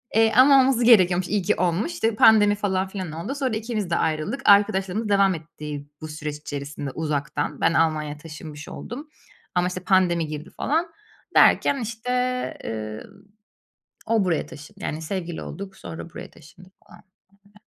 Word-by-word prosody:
Eee, 225 Hz, 0 st, +4 dB
ama 270 Hz, +1 st, +7 dB
olması 255 Hz, -2 st, +2 dB
gerekiyormuş, 185 Hz, -6 st, +5 dB
iyi 205 Hz, -1 st, +1 dB
ki 210 Hz, +4 st, +2 dB
olmuş. 185 Hz, -, -1 dB, 0.2 s
Pandemi, 210 Hz, -2 st, +6 dB
falan 190 Hz, -2 st, -1 dB
filan 185 Hz, -4 st, -6 dB
oldu. 170 Hz, -, -5 dB
Sonra 260 Hz, -5 st, -1 dB
ikimiz 215 Hz, -4 st, -3 dB
de 170 Hz, -, +1 dB
ayrıldık. 160 Hz, -, -1 dB
Arkadaşlığımız 200 Hz, 0 st, +3 dB
devam 195 Hz, -2 st, +4 dB
etti, 150 Hz, -2 st, -8 dB
bu 155 Hz, -, -6 dB
süreç 150 Hz, -1 st, -5 dB
içerisinde 145 Hz, -1 st, -6 dB
uzaktan. 150 Hz, -1 st, -3 dB
Ben 165 Hz, -, +3 dB
Almanya'ya 155 Hz, -2 st, +1 dB
taşınmış 150 Hz, -1 st, -10 dB
oldum. 285 Hz, +6 st, -8 dB, 0.5 s
Ama, 180 Hz, 0 st, +2 dB
işte, 185 Hz, 0 st, -4 dB
pandemi 175 Hz, -3 st, +2 dB
girdi, 150 Hz, +3 st, -7 dB
falan. 325 Hz, +5 st, -1 dB, 0.5 s
Derken, 275 Hz, -, +5 dB
işte, 230 Hz, +2 st, -4 dB, 0.5 s
ııı, 110 Hz, -1 st, -5 dB, 1.0 s
o 225 Hz, -3 st, +2 dB
buraya 170 Hz, -4 st, 0 dB
taşındı, 150 Hz, +1 st, -13 dB
yani, 155 Hz, +1 st, -4 dB
sevgili 170 Hz, 0 st, -4 dB
olduk, 190 Hz, 0 st, -8 dB
sonra 165 Hz, -1 st, -8 dB
buraya -, -, -9 dB
taşındı 175 Hz, +4 st, -17 dB, 0.2 s
falan, -, -, -17 dB, 0.4 s
öyle. 205 Hz, +1 st, -26 dB
185 Hz, 155 wpm, -24 LUFS, 155-215 Hz, 1.0 s, ama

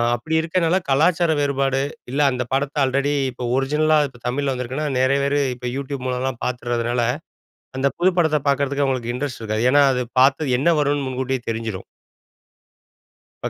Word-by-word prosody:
அப்பிடி 160 Hz, +8 st, -3 dB
இருக்கிறனால, 165 Hz, +2 st, +1 dB
கலாச்சார 160 Hz, +4 st, +3 dB
வேறுபாடு, 135 Hz, -1 st, +1 dB, 0.3 s
இல்ல 145 Hz, +2 st, 0 dB
அந்த 125 Hz, 0 st, -2 dB
படத்த 140 Hz, +1 st, -1 dB
ஆல்ரெடி 140 Hz, +2 st, +1 dB, 0.2 s
இப்போ 125 Hz, +1 st, -8 dB
ஒரிஜினலா 150 Hz, +3 st, +2 dB
இப்ப 120 Hz, -3 st, -17 dB
தமிழ்ல 135 Hz, +2 st, -1 dB
வந்திருக்குன்னா, 130 Hz, +4 st, -3 dB
நெறைய 130 Hz, +2 st, +3 dB
பேரு 145 Hz, +1 st, +1 dB, 0.2 s
இப்ப 125 Hz, 0 st, -5 dB
யூட்யூப் 135 Hz, -1 st, -5 dB
மூலலாம் 125 Hz, -1 st, -2 dB
பார்த்துறதுனால, 120 Hz, -1 st, -1 dB, 0.8 s
அந்த 135 Hz, +1 st, +2 dB
புது 180 Hz, +2 st, +4 dB
படத்த 160 Hz, -3 st, +3 dB
பார்க்கறதுக்கு 140 Hz, 0 st, +1 dB
அவுங்களுக்கு 125 Hz, -3 st, -2 dB
இன்ட்ரெஸ்ட் 125 Hz, -1 st, -4 dB
இருக்காது. 110 Hz, +1 st, -1 dB
ஏன்னா, 145 Hz, 0 st, +6 dB
அது 125 Hz, 0 st, -1 dB, 0.2 s
பார்த்தது 135 Hz, -1 st, +3 dB
என்ன 160 Hz, -, +2 dB
வருன்னு 145 Hz, -1 st, 0 dB
முன்கூட்டியே 130 Hz, 0 st, -2 dB
தெரிஞ்சிரும். 110 Hz, -4 st, -4 dB, 1.6 s
இப்ப -, -, -2 dB
135 Hz, 150 wpm, -21 LUFS, 125-145 Hz, 1.6 s, ஏன்னா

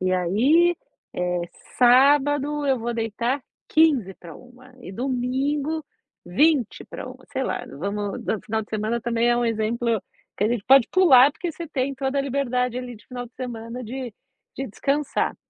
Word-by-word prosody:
E 185 Hz, 0 st, 0 dB
aí, 260 Hz, -, +3 dB, 0.4 s
eh, 180 Hz, 0 st, -1 dB, 0.4 s
sábado 285 Hz, +3 st, +4 dB
eu 265 Hz, -2 st, +2 dB
vou 235 Hz, +1 st, -3 dB
deitar 235 Hz, +4 st, -2 dB, 0.3 s
00:45 250 Hz, -, -1 dB
e 190 Hz, -, -9 dB
domingo 270 Hz, +6 st, -1 dB, 0.4 s
00:40", 270 Hz, -, 0 dB
sei -, -, -1 dB
lá, -, -, -3 dB
vamos 200 Hz, +5 st, -4 dB
no 215 Hz, -, -1 dB
final 220 Hz, 0 st, -2 dB
de -, -, -16 dB
semana 220 Hz, +2 st, -1 dB
também 235 Hz, +1 st, 0 dB
é 240 Hz, -, +3 dB
um 240 Hz, -, +1 dB
exemplo 230 Hz, 0 st, 0 dB, 0.4 s
que -, -, 0 dB
a -, -, +2 dB
gente 235 Hz, -3 st, -2 dB
pode 270 Hz, -2 st, +6 dB
pular, 290 Hz, -8 st, +6 dB
porque 335 Hz, +3 st, -5 dB
você 335 Hz, 0 st, -8 dB
tem 275 Hz, -1 st, -2 dB
toda 270 Hz, +1 st, -2 dB
a -, -, +2 dB
liberdade, 250 Hz, -3 st, -1 dB
ali, 250 Hz, -2 st, -7 dB
de 210 Hz, -, -21 dB
final 245 Hz, -1 st, -6 dB
de 235 Hz, -, -22 dB
semana 240 Hz, -1 st, -6 dB
de 250 Hz, 0 st, -6 dB, 0.4 s
de 270 Hz, -, -3 dB
descansar. 280 Hz, +7 st, -1 dB
250 Hz, 160 wpm, -24 LUFS, 225-275 Hz, 0.4 s, pode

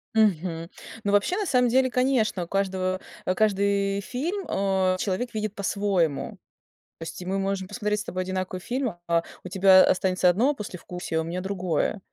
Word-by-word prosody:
Мгм. 170 Hz, -6 st, +1 dB, 0.3 s
Ну 200 Hz, -, 0 dB
вообще, 205 Hz, -, +2 dB
на 415 Hz, -, -1 dB
самом 250 Hz, -5 st, +3 dB
деле, 260 Hz, +2 st, +3 dB
конечно, 250 Hz, -7 st, +1 dB
у -, -, -18 dB
каждого 185 Hz, -1 st, -1 dB, 0.4 s
каждый 200 Hz, -1 st, +1 dB
фильм, 330 Hz, -, -3 dB
а, 190 Hz, -1 st, +1 dB
человек 210 Hz, +6 st, -2 dB
видит 215 Hz, -1 st, -2 dB
по-своему. 195 Hz, -6 st, 0 dB, 0.6 s
То -, -, -6 dB
есть 170 Hz, +2 st, -7 dB
мы 190 Hz, +2 st, -1 dB
можем 195 Hz, -1 st, -2 dB
посмотреть 210 Hz, 0 st, -1 dB
с -, -, -5 dB
тобой 185 Hz, 0 st, -3 dB
одинаковый 185 Hz, 0 st, -3 dB
фильм, 250 Hz, -3 st, -2 dB
а 170 Hz, 0 st, +2 dB, 0.2 s
у 180 Hz, -, -7 dB
тебя 190 Hz, 0 st, +7 dB
останется 185 Hz, 0 st, +3 dB
одно 235 Hz, +11 st, +3 dB
послевкусие, 180 Hz, -, -5 dB
а -, -, +1 dB
у -, -, -7 dB
меня 175 Hz, +2 st, -3 dB
другое. 185 Hz, 0 st, -1 dB
195 Hz, 170 wpm, -26 LUFS, 185-215 Hz, 0.6 s, тебя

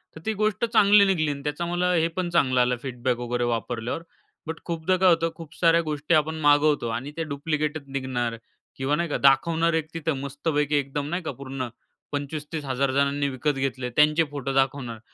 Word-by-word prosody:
तर 160 Hz, -, -10 dB
ती 220 Hz, -, 0 dB
गोष्ट 215 Hz, +1 st, +1 dB
चांगली 210 Hz, -3 st, +6 dB
निघाली 170 Hz, -6 st, +1 dB
आणि 140 Hz, -1 st, -6 dB
त्याचा 150 Hz, +4 st, -2 dB
मला 175 Hz, +1 st, 0 dB
हे 165 Hz, -1 st, +3 dB
पण 180 Hz, -2 st, -1 dB
चांगलं 140 Hz, -7 st, +2 dB
आलं 125 Hz, 0 st, +2 dB
फीडबॅक 125 Hz, -1 st, -1 dB
वगैरे 120 Hz, 0 st, -2 dB
वापरल्यावर, 120 Hz, +4 st, -2 dB, 0.5 s
बट 160 Hz, 0 st, -4 dB
खूपदा 170 Hz, +2 st, 0 dB
काय 185 Hz, 0 st, +5 dB
होतं 165 Hz, -1 st, +3 dB
खूप 165 Hz, -3 st, -11 dB
साऱ्या 170 Hz, -1 st, +4 dB
गोष्टी 150 Hz, 0 st, -2 dB
आपण 155 Hz, +1 st, +1 dB
मागवतो 145 Hz, -3 st, +4 dB
आणि 125 Hz, +5 st, -4 dB
ते 165 Hz, -, -1 dB
डुप्लिकेटच 150 Hz, +1 st, -2 dB
निघणार 130 Hz, -4 st, -2 dB, 0.4 s
किंवा 135 Hz, +2 st, 0 dB
नाही 170 Hz, +2 st, -1 dB
का -, -, 0 dB
दाखवणार 160 Hz, +5 st, +3 dB
एक 160 Hz, -1 st, 0 dB
तिथं 160 Hz, -3 st, -2 dB
मस्तपैकी 145 Hz, +1 st, -1 dB
एकदम 140 Hz, 0 st, -1 dB
नाही 175 Hz, +3 st, -2 dB
का 160 Hz, -, -3 dB
पूर्ण 130 Hz, -1 st, -5 dB, 0.4 s
₹25-30,000 145 Hz, -2 st, -2 dB
जणांनी 140 Hz, +1 st, +1 dB
विकत 140 Hz, +3 st, -1 dB
घेतले. 130 Hz, -2 st, -2 dB
त्यांचे 150 Hz, +5 st, +4 dB
फोटो 135 Hz, -2 st, -3 dB
दाखवणार 135 Hz, -4 st, 0 dB
145 Hz, 180 wpm, -25 LUFS, 135-165 Hz, 0.5 s, चांगली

